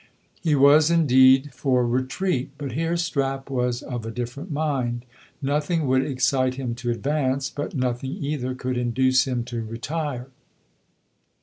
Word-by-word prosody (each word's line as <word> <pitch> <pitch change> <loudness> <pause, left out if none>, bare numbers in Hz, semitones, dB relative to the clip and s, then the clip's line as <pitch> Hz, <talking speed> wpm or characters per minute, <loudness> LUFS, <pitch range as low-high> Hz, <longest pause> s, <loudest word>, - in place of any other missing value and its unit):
He 160 -4 +2
was 145 +3 +6
indeed 135 -4 +5
for 125 -1 +1
retreat; 130 +4 -1
but 140 -3 -5
here 165 +6 -1
Strap 135 -5 -2
was 125 -2 -1
of 120 -3 -5
a 115 - -5
different 125 +8 -5
mind. 130 -5 -1 0.4
Nothing 150 +3 0
would 130 0 +3
excite 130 -1 +1
him 130 -3 -3
to 120 - -2
advance, 135 +2 -1
but 145 +2 -5
nothing 130 0 -2
either 140 -3 -3
could 125 -1 -2
induce 130 +2 +2
him 125 -2 -1
to 120 -1 -5
retire. 125 +3 -4
130 Hz, 140 wpm, -24 LUFS, 125-145 Hz, 0.4 s, was